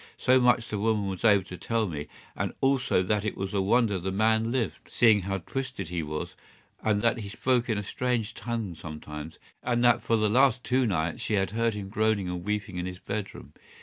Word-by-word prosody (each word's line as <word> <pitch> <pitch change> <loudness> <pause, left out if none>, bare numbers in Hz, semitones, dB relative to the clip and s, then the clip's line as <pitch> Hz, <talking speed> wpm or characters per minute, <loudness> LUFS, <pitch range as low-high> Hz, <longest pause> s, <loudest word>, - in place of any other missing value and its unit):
So 130 +1 +4
much 125 -1 +3
the 105 - -2
woman 105 -1 +1
was 95 -2 -5
able 100 -4 +5
to 90 0 -9
tell 115 -1 0
me, 75 -4 -5 0.3
and - - -2
also 135 -8 +2
that 105 +2 0
it 110 - -3
was 95 +1 -4
a 100 - +2
wonder 105 0 +2
the 95 +2 -3
man 110 +3 +2
lived, 120 -5 -2
seeing 110 -4 +4
how 95 +1 -2
twisted 100 -2 -5
he 85 -1 -2
was, 75 0 -4 0.5
and 105 -2 +1
that 115 +1 +2
he 100 -3 -6
spoke 125 +3 0
in 110 - +1
a 105 - -2
strange 120 +1 -1
tongue 115 -6 -4
sometimes, 75 -1 -8 0.2
and 120 -1 0
that 120 - +5
for 115 - +1
the 110 -1 +2
last 125 +2 +3
two 130 -1 +2
nights 80 -5 -1
she 105 - 0
had 95 -2 0
heard 115 0 0
him 100 -2 -5
groaning 110 -2 +1
and 90 -1 -4
weeping 105 -2 -3
in 90 +1 -2
his 90 0 -6
bedroom. 100 +1 -6
105 Hz, 215 wpm, -28 LUFS, 95-115 Hz, 0.5 s, able